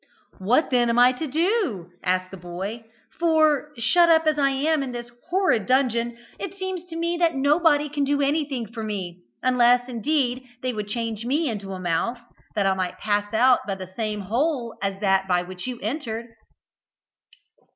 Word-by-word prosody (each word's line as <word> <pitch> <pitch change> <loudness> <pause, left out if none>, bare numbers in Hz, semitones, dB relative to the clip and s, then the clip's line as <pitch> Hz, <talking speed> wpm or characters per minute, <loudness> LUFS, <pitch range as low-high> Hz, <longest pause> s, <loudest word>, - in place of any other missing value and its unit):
"What 240 +12 +2
then 240 -2 +3
am 235 - +1
I 245 +1 +7
to 280 +5 -4
do?" 315 - 0
asked 185 0 0
the - - -7
boy. 190 +6 -6 0.3
"For, 310 -3 +3
shut 340 +9 +4
up, 325 -1 +5
as 305 -1 +2
I 275 -1 +4
am, 290 +3 +1
in 260 -2 -4
this 240 0 -7 0.2
horrid 355 - +2
dungeon, 240 -3 +1 0.2
it 390 -1 -6
seems 375 -2 -4
to 340 -2 -9
me 340 +1 -1
that 335 -2 +2
nobody 295 +2 +3
can 290 0 -2
do 285 +1 +1
anything 280 -3 0
for 230 - -5
me, 185 -5 -4 0.2
unless 245 -1 +4
indeed 255 0 0 0.2
they 255 -1 -1
would 210 -2 -4
change 225 0 -3
me 290 +7 0
into 200 -5 -4
a 185 - -6
mouse, 180 +7 -1 0.4
that 205 -2 +1
I 195 - +3
might 185 -1 -3
pass 205 -1 -1
out 245 +3 +5
by 195 - -1
the 185 -1 -9
same 215 -2 -2
hole 240 - -1
as 195 -1 -2
that 195 -1 +2
by 180 -1 +2
which 180 +4 -8
you 250 -2 -4
entered." 230 -1 -4
245 Hz, 185 wpm, -24 LUFS, 205-295 Hz, 0.4 s, I